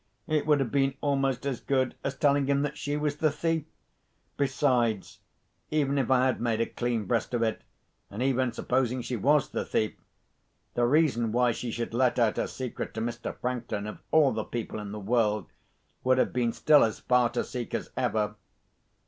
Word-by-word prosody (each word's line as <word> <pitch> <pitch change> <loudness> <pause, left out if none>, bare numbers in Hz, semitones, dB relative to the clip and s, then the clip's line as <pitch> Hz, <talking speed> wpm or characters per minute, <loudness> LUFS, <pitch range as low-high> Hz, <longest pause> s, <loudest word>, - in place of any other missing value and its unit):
It 155 -1 0
would 150 -2 +4
have 135 -4 -1
been 135 -1 +2
almost 135 -2 0
as 135 -3 -2
good 130 -2 0
as 140 - -2
telling 140 -1 +3
him 140 0 +2
that 145 0 -2
she 145 0 -2
was 150 -1 -1
the 155 0 +3
thief. 160 +1 -1 0.7
Besides, 125 -6 0 0.5
even 140 -2 +1
if 130 - 0
I 130 -1 +4
had 130 - 0
made 115 -2 0
a 115 - +2
clean 120 -3 -2
breast 115 +3 0
of 115 - +1
it, 110 -1 -1 0.5
and 110 +5 -4
even 130 -2 +1
supposing 125 0 0
she 125 - -3
was 145 +6 +3
the - - -2
thief, 110 - 0 0.8
the 120 - +2
reason 130 -6 +2
why 125 +1 +3
she 120 +1 -4
should 115 0 -4
let 125 +1 +2
out 115 -3 +2
her - - 0
secret 130 -4 -5
to - - -2
Mr. 120 +1 -4
Franklin, 120 -4 -3
of 105 - -7
all 155 -4 +5
the 110 -1 -2
people 115 -1 -5
in 105 -1 -6
the 105 - -5
world, 105 0 +1 0.6
would 130 0 +3
have - - +1
been 120 -2 +1
still 150 +4 +5
as 110 - 0
far 125 -1 +2
to 120 - -1
seek 125 -2 -5
as - - -4
ever. 105 -1 0
125 Hz, 195 wpm, -28 LUFS, 115-140 Hz, 0.8 s, all